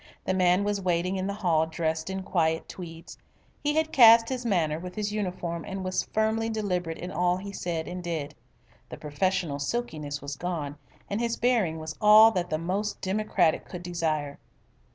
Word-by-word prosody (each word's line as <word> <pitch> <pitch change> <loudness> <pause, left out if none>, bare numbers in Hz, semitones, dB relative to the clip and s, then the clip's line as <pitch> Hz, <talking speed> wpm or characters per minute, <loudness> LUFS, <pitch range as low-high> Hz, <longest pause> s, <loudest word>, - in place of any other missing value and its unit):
The 185 - +1
man 180 +1 +3
was 205 -1 -1
waiting 180 +1 0
in 190 0 -2
the 200 - -3
hall 165 -6 +1
dressed 160 +1 -2
in 190 0 -4
quiet 160 -3 0
tweeds. 165 -2 -10 0.4
He 295 0 +1
had 315 0 +1
cast 230 -3 +7
his 250 -2 -3
manner 160 -7 +1
with 180 +1 -8
his 210 -1 -2
uniform 180 -5 -3
and 190 -1 -5
was 185 0 0
firmly 220 +1 +1
deliberate 180 -7 -2
in 180 +1 -6
all 180 +1 +1
he 200 +1 -7
said 170 -4 -3
and 180 0 -6
did. 155 -4 -3 0.6
The - - -8
professional 155 0 -1
silkiness 150 -5 -3
was 140 0 -6
gone, 155 -5 -4 0.3
and 205 +3 -2
his 235 -1 -1
bearing 225 -10 +1
was 160 0 -6
all 215 +1 +8
that 180 -4 -2
the 155 - 0
most 190 +6 -2
democratic 190 -4 +1
could 180 -1 -8
desire. 155 -5 -2
180 Hz, 180 wpm, -27 LUFS, 160-205 Hz, 0.6 s, all